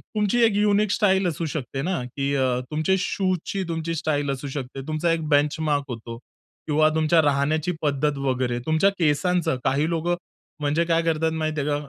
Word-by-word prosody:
तुमची 210 Hz, +3 st, +2 dB
एक 220 Hz, -3 st, +2 dB
unique 205 Hz, 0 st, +2 dB
style 190 Hz, -3 st, +2 dB
असू 165 Hz, 0 st, -2 dB
शकते 135 Hz, -3 st, -4 dB
ना, 175 Hz, +1 st, -1 dB
की 140 Hz, +3 st, -3 dB
अ, 130 Hz, -2 st, +2 dB, 0.2 s
तुमचे 155 Hz, +5 st, +1 dB
शूजची 185 Hz, 0 st, -1 dB
तुमची 165 Hz, 0 st, -2 dB
स्टाईल 145 Hz, -2 st, -1 dB
असू 135 Hz, +1 st, -5 dB
शकते. 135 Hz, 0 st, -6 dB
तुमचा 155 Hz, +2 st, 0 dB
एक 165 Hz, -2 st, -1 dB
बेंचमार्क 145 Hz, 0 st, +2 dB
होतो. 115 Hz, -1 st, -6 dB, 0.5 s
किंवा 155 Hz, 0 st, +4 dB
तुमच्या 160 Hz, +1 st, +4 dB
राहण्याची 150 Hz, +3 st, +1 dB
पद्धत 145 Hz, 0 st, 0 dB
वगैरे 130 Hz, -3 st, -1 dB
तुमच्या 160 Hz, +5 st, +3 dB
केसांचं, 170 Hz, 0 st, +1 dB
काही 145 Hz, +4 st, +1 dB
लोकं 170 Hz, +1 st, 0 dB, 0.5 s
म्हणजे 150 Hz, +3 st, +1 dB
काय 165 Hz, 0 st, +2 dB
करतात 160 Hz, -1 st, 0 dB
माहिती 155 Hz, -1 st, -2 dB
आहे 145 Hz, -, -2 dB
का? 145 Hz, -, +1 dB
155 Hz, 170 wpm, -24 LUFS, 145-170 Hz, 0.5 s, किंवा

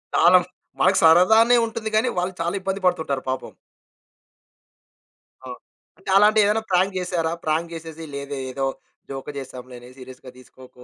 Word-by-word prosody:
తాళం, 180 Hz, 0 st, +5 dB, 0.4 s
మనకు 190 Hz, +1 st, +3 dB
సరదానే 220 Hz, +9 st, +6 dB
ఉంటుంది 225 Hz, -1 st, -5 dB
గానీ 220 Hz, -, +1 dB
వాళ్ళు 180 Hz, +1 st, -2 dB
చాలా 170 Hz, +3 st, -2 dB
ఇబ్బంది 195 Hz, 0 st, -4 dB
పడుతుంటారు 160 Hz, -7 st, -1 dB
పాపం. 130 Hz, -, -4 dB, 1.9 s
అవును. 125 Hz, -1 st, -9 dB, 0.4 s
అంటే 190 Hz, -, -11 dB
అలాంటియేవన్నా 210 Hz, +1 st, +3 dB
ప్రాంక్ 185 Hz, +2 st, +1 dB
జేసారా? 175 Hz, -3 st, -2 dB
ప్రాంక్ 165 Hz, +2 st, -1 dB
జేసేసి 165 Hz, 0 st, -9 dB
లేదే 140 Hz, 0 st, -6 dB
ఏదో 135 Hz, +1 st, -3 dB, 0.4 s
జోకు 135 Hz, +1 st, -7 dB
చేసాం, 130 Hz, -2 st, -8 dB
దీన్నేం 125 Hz, +1 st, -12 dB
సీరియస్‌గా 130 Hz, 0 st, -12 dB
తీసుకోకు 130 Hz, 0 st, -17 dB
165 Hz, 135 wpm, -22 LUFS, 135-195 Hz, 1.9 s, సరదానే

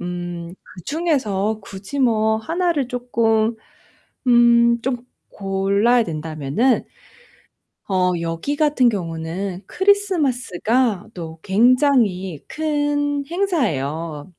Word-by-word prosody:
음 175 Hz, -1 st, -5 dB, 0.3 s
그 -, -, -17 dB
중에서 225 Hz, -, 0 dB
굳이 195 Hz, +8 st, -8 dB
뭐 220 Hz, -4 st, +2 dB
하나를 325 Hz, +2 st, -1 dB
쪼끔 230 Hz, -2 st, 0 dB, 0.7 s
음 235 Hz, -1 st, +5 dB
좀 255 Hz, 0 st, -1 dB, 0.3 s
골라야 200 Hz, +5 st, +1 dB
된다면은 155 Hz, -, -1 dB, 1.0 s
어 185 Hz, -2 st, +1 dB
여기 165 Hz, -, -3 dB
같은 290 Hz, -5 st, +3 dB
경우는 180 Hz, -1 st, -4 dB
크리스마스가 260 Hz, -, +1 dB
또 165 Hz, -2 st, -8 dB
굉장히 220 Hz, -, +2 dB
큰 290 Hz, -2 st, -1 dB
행사예요. 165 Hz, -, -2 dB
225 Hz, 190 characters per minute, -21 LUFS, 180-270 Hz, 1.0 s, 음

